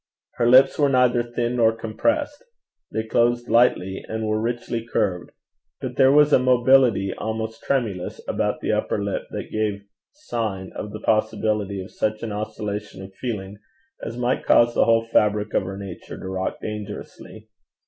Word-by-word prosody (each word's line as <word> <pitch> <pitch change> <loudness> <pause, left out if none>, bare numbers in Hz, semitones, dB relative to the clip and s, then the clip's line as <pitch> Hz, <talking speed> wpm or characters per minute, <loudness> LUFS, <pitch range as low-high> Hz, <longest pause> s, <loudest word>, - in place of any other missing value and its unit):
Her 120 - +3
lips 130 +4 +6
were 145 -1 +4
neither 125 -2 +3
thin 120 +1 -2
nor 115 -1 +4
compressed 290 - -1 0.5
they 110 - -2
closed 120 +2 +1
lightly, 95 -6 +2
and 110 0 -3
were 110 0 0
richly 120 0 -3
curved; 95 -6 -1 0.5
but - - -5
there 135 0 +5
was 150 +1 +5
a - - +7
mobility 125 -5 +4
almost 110 +1 -4
tremulous 110 -10 -2
about - - -1
the - - -1
upper - - 0
lip 100 - -3
that - - -6
gave 105 -2 -2 0.3
sign 110 - -4
of 105 - -5
the 110 - -8
possibility 110 -2 0
of 95 - -13
such 110 +1 -2
an 115 - -3
oscillation 105 -1 -5
of 95 0 -11
feeling 100 -3 -5 0.4
as 115 - -5
might 125 +1 0
cause 120 0 +4
the - - +3
whole 115 0 +3
fabric 105 -2 +1
of - - +3
her 95 +1 -6
nature 100 -3 -8
to - - -7
rock 95 0 -3
dangerously. 105 +1 -8
110 Hz, 165 wpm, -23 LUFS, 105-120 Hz, 0.5 s, a